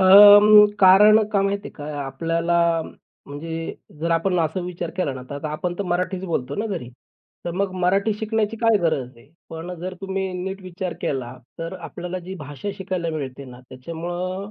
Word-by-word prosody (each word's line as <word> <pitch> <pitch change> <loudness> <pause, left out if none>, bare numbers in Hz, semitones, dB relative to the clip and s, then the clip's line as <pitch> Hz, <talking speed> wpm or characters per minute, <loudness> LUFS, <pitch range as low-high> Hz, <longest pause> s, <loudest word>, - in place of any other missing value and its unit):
अं, 205 +2 +9
कारण 210 +3 +7
का 200 - +3
माहितेय 200 +1 -2
का, 145 - -9 0.2
आपल्याला 165 +5 -1 0.7
म्हणजे 165 +3 -6 0.3
जर 170 +1 -1
आपण 175 +2 +1
असा 160 +3 -1
विचार 175 -1 -5
केला 180 -7 -1
ना, 130 - -8
तर - - -4
आता 145 +2 -5
आपण 175 +3 -3
तर - - 0
मराठीच 185 +1 -2
बोलतो 140 -6 -2
ना 215 - -1
घरी, 180 - -5 0.6
तर 175 - -2
मग 190 +1 -1
मराठी 195 +4 +2
शिकण्याची 220 0 -1
काय 225 -1 +3
गरज 135 -7 -1
आहे. 115 +4 -19 0.2
पण 165 +2 -6
जर 185 +1 -5
तुम्ही 190 -1 -3
नीट 190 +1 -5
विचार 185 -1 -5
केला, 130 -3 -3 0.3
तर 165 +1 -5
आपल्याला 180 +1 -6
जी 190 - -6
भाषा 145 +4 -7
शिकायला 185 -3 -3
मिळते 140 -3 -5
ना 125 -1 -12
त्याच्यामुळं, 175 +7 -5
180 Hz, 175 wpm, -22 LUFS, 160-195 Hz, 0.7 s, अं